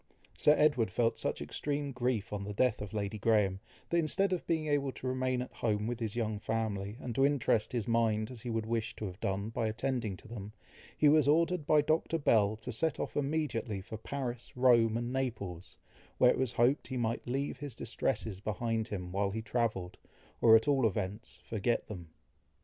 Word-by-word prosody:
Sir 150 - +5
Edward 145 -8 +3
felt 115 +4 +1
such - - -1
extreme 145 -1 -3
grief 120 -5 -1
on 100 -1 -3
the 100 0 -5
death 125 +1 +2
of 105 -2 -6
Lady 105 0 -3
Graham, 100 -4 +2 0.3
that 170 - +3
instead 185 +4 +2
of 180 - -3
being 160 -2 0
able 145 -2 +1
to - - -10
remain 130 -1 0
at - - -11
home 105 -2 -1
with 120 +1 -3
his 110 -2 -3
young 110 -3 -1
family, 105 -1 -2
and 125 -3 -5
to 135 - +2
interest 130 -6 +2
his 120 -2 -2
mind 115 -1 +1
as 120 -3 -10
he 120 - -5
would 115 -1 -1
wish 115 0 -2
to 110 - -5
have 90 -1 -7
done, 100 +1 -2
by 115 0 -1
attending 115 -3 -2
to - - -15
them, 105 -2 -8 0.4
he 150 - +5
was 150 -1 +5
ordered 165 +1 +2
by 150 -1 +5
Dr. 160 +2 +1
Bell, 110 -8 +3
to 110 - -7
set 155 +6 0
off - - -4
immediately 140 -8 -1
for 110 +4 -8
Paris, 125 0 -5
Rome, 115 -3 +5
and 120 +1 -3
Naples, 105 -10 -4 0.4
where 125 - +6
it - - -1
was 130 -2 0
hoped 125 +6 +2
he 130 - -4
might 115 0 -2
leave 135 +2 -2
his 140 -3 -7
distresses 110 -4 -2
behind 110 +2 -2
him 90 -6 -5
while 100 +1 0
he 110 +3 -4
travelled, 110 -6 -2 0.4
or 110 -1 +8
at 110 +5 +4
all 135 -5 +4
events, 105 +1 -4
forget 115 +2 -1
them. 90 -6 -8
115 Hz, 200 wpm, -32 LUFS, 105-130 Hz, 0.4 s, or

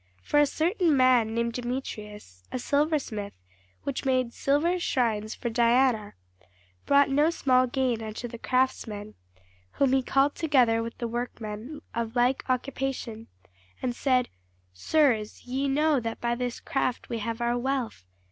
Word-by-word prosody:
For 295 - +2
a 295 - +5
certain 330 0 +1
man 245 -4 +4
named 235 0 0
Demetrius, 210 - -6
a - - -2
silversmith, 280 -7 -1 0.5
which 280 -2 -3
made 255 -3 +1
silver 325 +6 +1
shrines 225 -9 0
for 235 - -4
Diana, 235 -2 +2 0.7
brought 280 -1 +5
no 295 +3 +4
small 255 -6 +3
gain 250 -2 0
unto 220 +2 -5
the 235 -1 -9
craftsmen; 220 -5 -1 0.6
whom 270 -2 +2
he 270 - +4
called 275 +2 +2
together 255 -8 +3
with 230 0 -6
the 235 - -3
workmen 235 +2 -5
of 230 0 -3
like 245 +2 +2
occupation, 255 -3 -3 0.5
and 245 -1 -2
said, 255 -2 +1 0.4
Sirs, 225 - +1
ye 265 +3 -1
know 295 +1 +2
that 230 -1 -4
by 235 0 0
this 245 0 -3
craft 255 -2 -2
we 230 - -3
have 230 +1 -3
our 240 0 +1
wealth. 245 - -2
250 Hz, 145 wpm, -27 LUFS, 230-270 Hz, 0.7 s, a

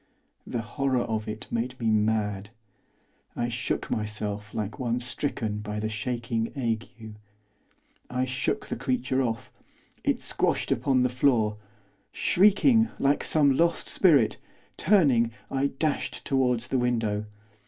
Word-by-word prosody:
The 115 -2 -3
horror 130 +2 0
of 110 -1 -3
it 110 +3 -5
made 125 +2 -2
me 115 - -4
mad. 105 -2 0 0.9
I 120 0 -1
shook 120 +1 -3
myself 105 -1 -3
like 110 +4 -4
one 120 -1 0
stricken 120 -4 -2
by 105 0 -4
the 110 +1 -2
shaking 115 +1 -2
ague. 115 -3 -1 1.2
I 125 +1 0
shook 130 +1 -2
the - - -4
creature 130 +1 0
off. 115 -3 -3 0.5
It - - +1
squashed - - 0
upon 130 -2 +2
the 125 - +2
floor. 120 -4 +2 0.5
Shrieking 225 +4 +4
like 140 +1 +2
some 145 -4 +3
lost 170 +3 +1
spirit, 145 - +4 0.4
turning, 145 - +4 0.2
I 135 +1 +1
dashed 145 +2 -2
towards 125 -3 +1
the 130 - +1
window. 115 -4 0
120 Hz, 130 wpm, -27 LUFS, 110-135 Hz, 1.2 s, Shrieking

